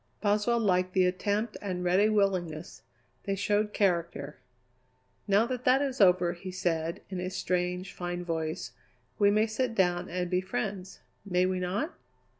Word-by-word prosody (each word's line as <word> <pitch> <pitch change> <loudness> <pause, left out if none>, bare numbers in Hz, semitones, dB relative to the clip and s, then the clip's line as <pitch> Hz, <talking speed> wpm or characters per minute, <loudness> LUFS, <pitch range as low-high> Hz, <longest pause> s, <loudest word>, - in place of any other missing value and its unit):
Boswell 210 +3 +2
liked 185 -4 +1
the 185 -1 +4
attempt 205 +4 -1
and 185 -3 -3
ready 185 +4 +4
willingness; 185 -6 -1 0.4
they 195 - 0
showed 210 +1 +1
character. 170 -8 -1 0.9
"Now 200 +3 +4
that 250 0 -4
that 255 +1 +5
is 265 -3 -2
over," 180 -2 +5
he 185 +2 -8
said 170 -3 -2
in 185 - -3
his 185 +1 -4
strange, 180 +1 -1
fine 175 0 -4
voice, 160 0 -3 0.5
"we 200 -1 +6
may 215 +2 +3
sit 230 +2 -2
down 180 -2 +1
and 180 +1 -2
be 180 +1 +1
friends. 190 0 -4 0.2
May 180 -2 +1
we 185 0 0
not?" 200 - -2
185 Hz, 155 wpm, -29 LUFS, 180-205 Hz, 0.9 s, we